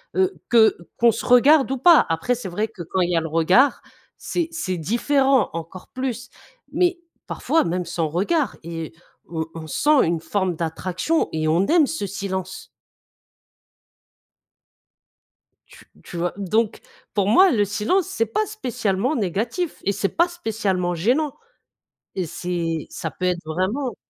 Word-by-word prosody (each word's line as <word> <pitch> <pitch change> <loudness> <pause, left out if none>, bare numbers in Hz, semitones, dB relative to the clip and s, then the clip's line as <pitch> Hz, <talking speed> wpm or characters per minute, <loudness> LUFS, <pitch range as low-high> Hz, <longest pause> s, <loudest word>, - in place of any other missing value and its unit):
heu, 380 0 +2 0.2
que 225 -2 +5 0.2
qu'on 235 0 +5
se - - -5
regarde 270 +3 +5
ou 270 - -1
pas. 335 +4 +6
Après, 165 +10 0
c'est 235 -4 -7
vrai 210 +5 -1
que 190 -5 -9
quand 185 +3 -2
il 175 - +1
y 170 - +2
a - - +2
le 160 - -4
regard, 180 - +3 0.4
c'est 345 -2 -2
c'est 190 - -3
différent, 265 - +2
encore 165 +2 -8
plus, 255 -1 -4 0.4
mais 360 -1 +1 0.3
parfois, 325 - 0
même 180 +2 -1
sans 170 -1 -2
regard 205 - 0
et 165 -1 -6 0.4
on 160 -1 -3
on 160 -1 -7
sent 295 - +3
une 165 -1 -1
forme 180 +2 -1
d'attraction 180 - -1
et 155 0 -1
on 170 +5 +3
aime 320 -3 +4
ce 285 -10 -3
silence. 190 -1 -5 3.0
Tu - - -17 0.2
tu 175 - -9
vois, 175 +1 -1
donc, 210 +3 0 0.3
pour 200 -2 +1
moi, 370 - +6
le 210 -8 +2
silence, 220 - 0
c'est 230 -12 -1
pas 230 - 0
spécialement 250 - -1
négatif 230 - -2
et 200 - +1
c'est 200 0 -1
pas 340 +1 +3
spécialement 210 - -2
gênant. 255 - +1 0.8
Et 185 - -1
c'est 165 -1 -3
ça 165 - -5
peut 185 - -5
être 180 -1 +1
vraiment 190 - -2
205 Hz, 155 wpm, -22 LUFS, 175-270 Hz, 3.0 s, pas